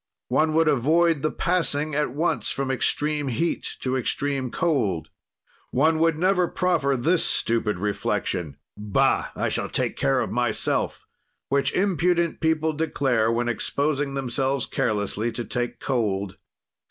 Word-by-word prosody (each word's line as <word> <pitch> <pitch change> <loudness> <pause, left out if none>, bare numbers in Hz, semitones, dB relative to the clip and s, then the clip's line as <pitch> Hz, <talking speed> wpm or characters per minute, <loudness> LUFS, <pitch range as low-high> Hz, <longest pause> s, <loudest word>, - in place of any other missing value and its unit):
"One 155 0 +2
would 165 0 +4
avoid 155 +3 +3
the 155 - +1
passing 155 -5 0
at 150 0 +1
once 150 +7 -1
from 135 -1 -2
extreme 150 +2 0
heat 135 +7 -2
to 130 0 -1
extreme 135 +1 -1
cold. 110 - 0 0.6
"One 155 +4 +2
would 165 -1 +3
never 180 +1 +2
proffer 165 -8 +1
this 165 +8 +2
stupid 115 -3 0
reflection: 90 -5 -2 0.2
Bah! 105 -1 +1
I - - -1
shall - - -2
take - - -1
care 70 - +2
of - - -3
myself, - - -1 0.4
which 140 0 +2
impudent 175 -3 +1
people 160 -1 +1
declare 135 -7 +1
when 120 +1 0
exposing 140 +4 -1
themselves 135 0 -1
carelessly 105 +2 -1
to 120 +1 -4
take 120 0 -3
cold. 100 -7 -1
140 Hz, 135 wpm, -24 LUFS, 120-160 Hz, 0.6 s, would